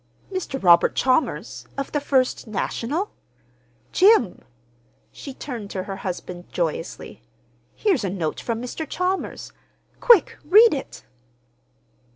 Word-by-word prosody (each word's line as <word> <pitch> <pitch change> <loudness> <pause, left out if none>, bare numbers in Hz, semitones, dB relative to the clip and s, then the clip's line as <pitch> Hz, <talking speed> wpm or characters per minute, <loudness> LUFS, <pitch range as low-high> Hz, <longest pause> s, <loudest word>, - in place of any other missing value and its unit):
"Mr. 370 -8 -4
Robert 175 -4 +5
Chalmers, 260 +4 0
of 275 - -4
the 295 - 0
First 260 -4 0
National? 265 - -2 0.8
Jim!" 370 - +4 0.7
She 280 - -9
turned 245 -6 -7
to 190 -2 -4
her 195 0 -6
husband 180 -1 -6
joyously. 165 - -4 0.5
"Here's 380 - +1
a 195 - -1
note 175 -5 -3
from 230 -1 -3
Mr. 295 +5 -5
Chalmers. 365 +1 -3 0.5
Quick—read 435 -1 +5
it!" 270 - -6
260 Hz, 110 wpm, -23 LUFS, -, 0.8 s, Robert